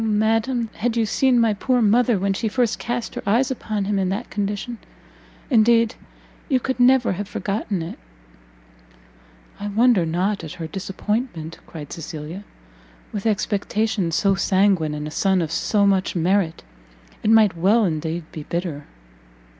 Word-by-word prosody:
Oh - - -1
madam, 225 +2 +1
had 235 +1 -1
you 225 - +3
seen 250 +3 +2
my 225 -2 +3
poor 250 +5 +1
mother 235 +1 +3
when 195 +1 0
she 220 +3 -2
first 235 +1 0
cast 240 -1 -3
her - - -5
eyes 245 +6 +2
upon 215 -5 -3
him 200 0 0
in 190 -1 0
that 205 +6 -4
condition! 210 +3 -3 0.7
indeed 230 -1 +4 0.6
you 265 -3 +3
could 260 +1 -3
never 250 0 +5
have 195 +2 -4
forgotten 200 -3 -3
it!" 165 - -8 1.6
"I 205 - -4
wonder 220 -1 +3
not 180 +4 -1
at 160 +1 -7
her 165 - -6
disappointment," 195 -1 -4
cried 150 -3 -8
Cecilia; 160 +3 -7 0.7
"with 205 +1 -3
expectations 205 -3 0
so 195 -1 +3
sanguine, 185 -4 +2
and 150 0 -4
a - - -7
son 190 +3 +2
of 165 -3 -2
so 200 +4 +1
much 190 -2 +1
merit, 175 0 +1 0.6
it - - 0
might 220 -4 +5
well 205 +7 +3
indeed 165 0 -2
be 155 - -7
bitter." 165 -2 -4
205 Hz, 155 wpm, -22 LUFS, 180-225 Hz, 1.6 s, never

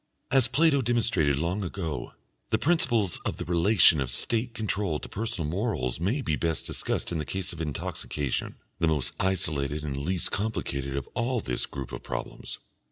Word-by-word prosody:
As 135 -3 +5
Plato 150 -3 +4
demonstrated 110 - +2
long 85 +7 0
ago, 85 -5 -4 0.4
the 110 - +3
principles 120 - +2
of - - -2
the - - -4
relation 85 -2 +5
of 65 - -1
State 115 - 0
control 100 -7 0
to - - -8
personal 100 -7 -2
morals 80 - -1
may 110 - +1
be 75 - +1
best 80 0 -1
discussed - - -2
in 85 - -1
the - - -1
case 95 +3 -3
of 85 - -6
intoxication, 75 -2 -2 0.2
the 85 - +3
most 75 -6 +1
isolated 75 -6 +1
and 70 -3 -2
least 85 +6 -1
complicated 70 -11 -2
of 70 -2 -2
all 120 +1 0
this 65 - -1
group 70 -2 -6
of - - -5
problems. - - -5
85 Hz, 170 wpm, -28 LUFS, 75-110 Hz, 0.4 s, As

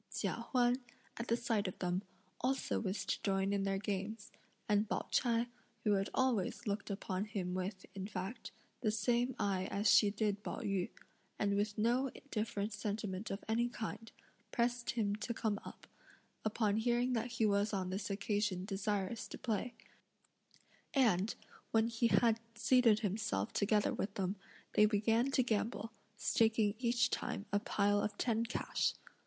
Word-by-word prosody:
Chia - - -2
Huan, 245 -1 +4 0.4
at 235 - -4
the 230 - +2
sight 225 -4 0
of 185 - -5
them, 180 0 0 0.4
also 265 +2 0
wished 195 -1 -2
to - - 0
join 195 0 +1
in 200 -1 +1
their 195 0 +1
games; 205 +2 -3 0.4
and 210 0 +2
Pao - - -1
ch'ai, 235 -2 +3 0.4
who 210 - +3
had 195 0 +1
always 250 -8 +1
looked 205 0 -2
upon 195 -1 -2
him 195 -5 -3
with, 185 +1 -3
in 195 0 -4
fact, 195 +3 -5 0.3
the 220 - +1
same 240 +3 +1
eye 190 -2 0
as 205 +2 0
she 205 - +7
did 205 0 0
Pao - - -4
yü, 195 -3 0 0.5
and 200 -1 +1
with 205 +1 0
no 240 +5 +2 0.2
different 210 -1 -1
sentiment 205 -1 -3
of 195 - -4
any 235 +2 +2
kind, 225 -1 -5 0.4
pressed 240 0 0
him 210 -4 +1
to 235 +2 -3
come 210 -3 0
up, - - -10 0.6
upon 215 -1 +1
hearing 240 +2 +2
that 240 +1 -1
he 225 -1 +2
was 205 0 +2
on 185 -3 -1
this 195 +2 -3
occasion 200 -2 0
desirous 200 +1 -2
to - - -7
play; 230 +1 -2 1.2
and, 220 -6 +3 0.3
when 225 0 +3
he 230 0 +2
had 230 -1 +4 0.2
seated 230 -2 +5
himself 185 - -1
together 210 +1 +2
with 200 0 -3
them, 190 0 -1 0.4
they 210 - +6
began 225 +4 +2
to 270 -1 +3
gamble, 225 -1 -1 0.3
staking 220 -2 +3
each 240 -1 +2
time 200 - -2
a 205 - +4
pile 205 0 +2
of 205 -1 -2
ten 230 -2 +1
cash. 235 +2 0
210 Hz, 160 wpm, -36 LUFS, 200-230 Hz, 1.2 s, she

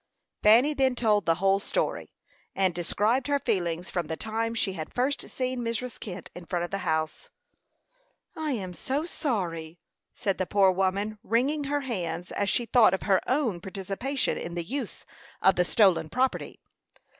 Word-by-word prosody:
Fanny 235 +8 +6
then 265 -3 +2
told 210 -6 +2
the 165 - +4
whole 195 +2 +3
story, - - -2 0.4
and 190 -2 +2
described 210 - +1
her 285 0 +2
feelings 175 -8 -1
from 175 -4 -2
the 160 +1 -4
time 225 +1 -2
she 195 -4 0
had 160 -4 -6
first 265 +3 -1
seen 255 -1 -2
Mrs. 235 +1 -3
Kent 185 -4 -7
in 180 - -9
front 175 0 -1
of - - -10
the 195 - -2
house. 160 -3 -2 1.1
"I 310 -3 -2
am 190 -6 -4
so 275 - -2
sorry!" 175 - -3 0.4
said 195 -2 -1
the 185 - 0
poor 195 -2 +4
woman, 195 +3 -1
wringing 275 +6 +1
her 290 +1 0
hands 180 -9 -4
as 200 - 0
she 240 - +1
thought 225 -4 +5
of - - -7
her 195 -3 +3
own 250 - +1
participation 195 +9 -2
in 170 +1 -6
the 170 - -2
use 250 +4 -5 0.3
of 190 - +5
the 180 - +3
stolen 180 -4 +3
property. 255 +9 -1
200 Hz, 170 wpm, -27 LUFS, 180-250 Hz, 1.1 s, Fanny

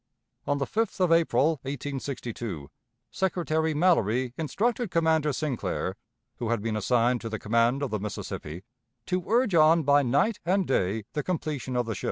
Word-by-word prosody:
On 145 - +1
the 140 - -1
5th 220 +3 -2
of 180 -2 +3
April, 165 -2 +3
1862, 125 - -5 0.4
Secretary 160 -4 0
Mallory 130 - +2
instructed 225 - -1
Commander 160 -3 +2
Sinclair, 140 -2 -2 0.4
who 115 - -3
had 115 -1 +1
been 110 -1 -1
assigned 120 +3 +2
to 115 - -5
the 110 - -3
command 115 +6 +1
of 140 - -2
the 105 - -1
Mississippi, 95 -4 -6 0.4
to 185 -1 -1
urge 235 -2 +2
on 160 0 +5
by 145 0 +5
night 145 - +1
and 190 +2 +1
day 110 - 0
the 150 - -1
completion 150 -6 -3
of 125 -1 +1
the 110 - -3
ship. - - -7
140 Hz, 165 wpm, -27 LUFS, 115-165 Hz, 0.4 s, on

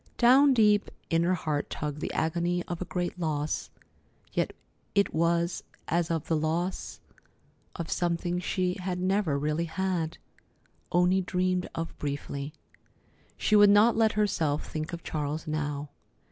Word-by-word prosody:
Down 265 +3 +6
deep 210 -3 +4 0.2
in 165 0 +3
her 180 +2 +2
heart 155 -4 -2
tugged 150 0 -4
the - - -2
agony 170 +2 0
of 175 -1 -5
a - - -2
great 175 +2 -3
loss, 155 -3 -1 0.6
yet - - 0 0.4
it 200 0 +3
was 170 +2 +1 0.2
as 170 0 +1
of 165 -2 -1
the 165 - +2
loss 165 +4 -2 0.8
of 170 -2 -5
something 175 0 0
she 180 +1 -1
had 180 -1 -2
never 185 -5 +1
really 150 +3 0
had—only 180 +1 -2
dreamed 185 0 0
of 165 0 -4
briefly. 140 0 -4 0.9
She 215 - +2
would 205 -1 +8
not 210 +3 +6
let 220 -1 +3
herself 165 -8 0
think 155 0 -4
of 170 -1 -6
Charles 150 0 -3
now. 150 -2 -3
170 Hz, 140 wpm, -28 LUFS, 155-185 Hz, 0.9 s, would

